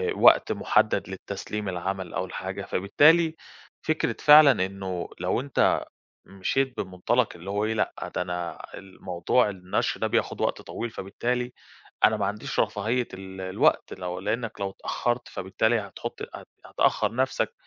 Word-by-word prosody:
وقت - - +6
مُحدَّد - - +1
للتسليم 105 -2 -5
العمل 95 0 -4
أو - - -1
الحاجة، - - -5
فبالتالي 160 - +4 0.5
فكرة 155 0 0
فعلًا 150 -9 +7
إنه 95 -2 -5
لو - - 0
أنت 140 0 +2 0.4
مشيت 125 +7 -1
بمُنطلق 95 +6 0
اللي 85 +3 -9
هو 105 +1 0
إيه، 110 - 0
لأ، 110 - -2
ده - - 0
أنا 90 -1 -4
الموضوع 95 +3 0
النشر 90 -2 -2
ده - - +1
بياخُد - - -1
وقت - - 0
طويل، 120 - -5
فبالتالي 120 +5 -3 0.5
أنا 110 0 +5
ما 100 - 0
عنديش 105 +2 -3
رفاهية 115 +4 0
ال 95 0 -8
الوقت، 95 0 +1
لو 90 0 -5
لإنّك 110 +3 -3
لو 100 -1 -1
اتأخَّرت، 120 +5 -2
فبالتالي 110 +5 0
هتحُط 100 -1 -7
هت - - -11 0.2
هتأخّر 110 +2 +1
نَفْسك، 130 +1 0
100 Hz, 145 wpm, -26 LUFS, 95-120 Hz, 0.5 s, فعلًا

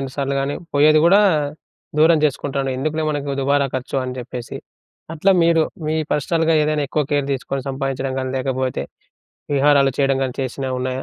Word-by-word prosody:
2 135 -1 -5
సార్లు 140 0 -1
గానీ 140 +1 -2 0.2
పోయేది 155 +2 +5
గూడా 200 +4 +6 0.8
దూరం 160 +1 +5
చేసుకుంటాండు. 140 -1 -1
ఎందుకులే 155 +2 -1
మనకు 145 -1 -3
దుబారా 140 +1 +2
ఖర్చు 130 +1 -3
అని 125 0 -5
చెప్పేసి. 120 -1 -7 0.6
అట్లా 190 +5 +2
మీరు, 165 -1 +4 0.2
మీ 155 - 0 0.2
పర్సనల్‌గా 165 +2 +1
ఏదైనా 150 -1 0
ఎక్కువ 150 -2 0
కేర్ 145 -1 +1
తీసుకొని, 135 +1 -4
సంపాదించడం 135 -1 -3
గానీ, 130 0 -3
లేకపోతే 130 0 -2 0.7
విహారాలు 140 -1 +4
చెయ్యడం 135 -1 +2
గానీ 130 -2 -2
చేసినవున్నాయా? 130 0 -3
140 Hz, 150 wpm, -20 LUFS, 130-150 Hz, 0.8 s, గూడా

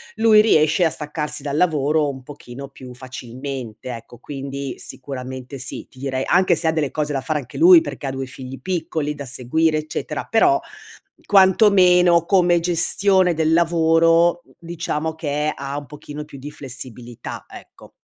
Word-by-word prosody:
lui 220 -1 +6
riesce 155 -5 +3
a 165 - +4
staccarsi 150 -1 -5
dal 140 -1 -3
lavoro 150 -3 +2
un 130 -1 -7
pochino 140 -1 -10
più 130 -2 -12
facilmente 130 -1 -7
ecco 115 +1 -13
quindi 140 0 -6
sicuramente 130 0 -7
sì, 135 - -6
ti 130 - -18
direi 130 -1 -2
anche 185 -1 +3
se 165 - -3
ha 160 - +4
delle 155 -3 0
cose 150 -1 -2
da 135 - -1
fare 155 +1 -2
anche 125 -4 -10
lui 350 +1 +9
perché 145 - -6
ha - - -2
2 135 0 -4
figli 130 0 -9
piccoli 160 -2 -3
da 140 - -7
seguire, 145 +5 0
eccetera, 155 0 -4
però, 340 +10 +4 0.7
quantomeno 185 -3 +5
come 175 -2 +3
gestione 180 +2 +2
del 160 0 +1
lavoro, 165 0 +3 0.2
diciamo 160 -2 -3
che 150 -1 -2
ha 140 +1 -5
un 145 - -6
pochino 150 +1 -9
più 145 -2 -12
di 145 +3 -7
flessibilità, 125 -4 -8
ecco. - - -14
150 Hz, 160 wpm, -21 LUFS, 135-170 Hz, 0.7 s, lui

